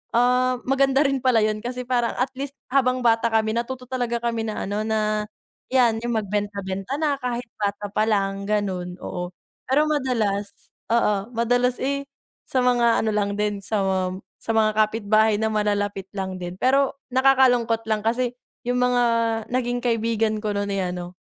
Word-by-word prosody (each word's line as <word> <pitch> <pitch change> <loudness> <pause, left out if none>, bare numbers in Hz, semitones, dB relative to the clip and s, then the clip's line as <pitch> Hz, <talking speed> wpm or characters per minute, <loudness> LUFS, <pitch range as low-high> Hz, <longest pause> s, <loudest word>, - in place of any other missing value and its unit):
ah, 250 +1 +3
maganda 270 +1 +3
rin 275 -1 +1
pala 255 -3 +4
yun 215 0 0
kasi 250 +1 -4
parang 240 -2 0
at 255 - +1
least 275 0 -4 0.2
habang 255 -2 +3
bata 230 0 +4
kami 220 -1 +2
natuto 250 +2 -4
talaga 245 -2 -1
kami 235 -1 -1
na 215 - -3
ano 205 +2 -2
na 215 -1 0 0.5
yan 240 -4 +3
yung 240 -1 0
magbenta 205 -1 -2
benta 195 +8 -3
na 300 -2 +1
kahit 245 -1 -2
bata 205 0 -2
palang 200 -2 0
ganun, 185 -4 -1
oo. 180 -1 -5 0.4
Pero 290 +4 +4
madalas, 220 -9 0 0.4
oo 210 -2 +1
madalas 245 +2 +1
eh, 280 +1 -1 0.4
sa 260 - 0
mga 240 -2 +3
ano - - +1
lang 205 -1 0
din 210 -1 0
sa 210 +1 0
mga 190 -1 +1 0.4
sa - - -2
mga 215 -1 +4
kapitbahay 215 0 +2
na 220 - +1
malalapit 205 -2 -1
lang 190 -2 -4
din. 175 0 -5
Pero 275 +2 +2
nakakalungkot 255 -4 +4
lang 215 -1 +1
kasi 240 +2 +1 0.3
yung 245 +1 0
mga 250 0 +3 0.5
naging 245 -1 0
kaibigan 225 -2 +1
ko 210 -1 -1
nun 200 0 -1
eh, 190 -2 -1
ano 180 0 -7
225 Hz, 165 wpm, -23 LUFS, 205-250 Hz, 0.5 s, pala